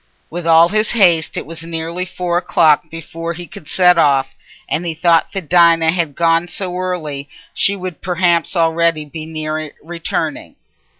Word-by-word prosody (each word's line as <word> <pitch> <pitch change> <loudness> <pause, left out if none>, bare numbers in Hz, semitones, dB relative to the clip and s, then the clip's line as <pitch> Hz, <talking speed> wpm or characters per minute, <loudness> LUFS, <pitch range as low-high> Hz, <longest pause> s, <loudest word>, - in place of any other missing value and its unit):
With 170 0 -5
all 165 +1 +6
his 215 +3 +1
haste 175 -8 +3
it - - -4
was 165 +1 -9
nearly 165 +2 -4
four 180 -1 -3
o'clock 160 -2 +2
before 165 +1 -6
he 175 +1 -8
could 175 -4 -12
set 180 +3 +4
off, 135 -3 +2 0.3
and 160 - -2
he 165 -2 -3
thought 165 0 +2
that 195 - -3
as 155 - -23
Dinah 170 -2 +4
had 165 -5 -1
gone 165 0 +2
so 180 0 -4
early, 155 -6 -4 0.2
she 200 - +2
would 185 -3 -7
perhaps 175 -1 0
already 165 -2 +1
be 155 +1 -8
near 155 -1 -4
returning. 170 0 -4
165 Hz, 170 wpm, -17 LUFS, 160-180 Hz, 0.3 s, all